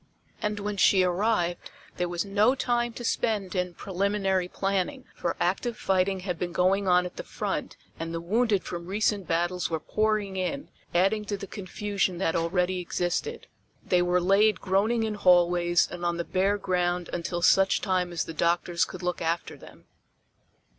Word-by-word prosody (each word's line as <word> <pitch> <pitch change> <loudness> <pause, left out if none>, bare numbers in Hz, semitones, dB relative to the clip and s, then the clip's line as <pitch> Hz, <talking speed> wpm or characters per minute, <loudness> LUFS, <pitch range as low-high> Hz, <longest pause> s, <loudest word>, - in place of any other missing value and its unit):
And 210 0 -1
when 205 0 -3
she 190 0 +5
arrived 180 -1 +1 0.4
there 180 -1 -1
was 175 +2 -2
no 210 +6 +3
time 240 -2 0
to 240 - -8
spend 210 -5 -1
in 180 -2 -2
preliminary 195 -1 0
planning, 195 +9 -2
for 170 - -2
active 210 +6 0
fighting 190 0 +1
had 180 -3 -4
been 175 -1 -2
going 190 +3 +2
on 180 0 +4
at 180 - -8
the - - -5
front - - -4 0.2
and 165 0 -4
the 165 - -3
wounded 210 +3 +1
from 170 0 -6
recent 205 -1 0
battles 175 +2 0
were 160 -1 -1
pouring 215 +1 0
in, 230 +10 -3 0.2
adding 195 +5 +2
to 205 0 -3
the 195 - -7
confusion 200 -1 -2
that 170 -3 0
already 180 +2 0
existed. 180 - -2 0.4
They 180 - +3
were 180 0 +2
laid 195 +2 +3
groaning 210 +5 +1
in 220 -1 -1
hallways 175 -3 +4
and 175 - -7
on 175 0 0
the 170 - -1
bare 195 +2 +1
ground 180 -2 -1
until 175 0 -3
such 195 +1 +4
time 185 -2 0
as 170 - -1
the 165 - -7
doctors 170 +2 +1
could - - -9
look 180 0 -2
after 165 +1 -2
them. - - -15
185 Hz, 175 wpm, -27 LUFS, 175-205 Hz, 0.4 s, she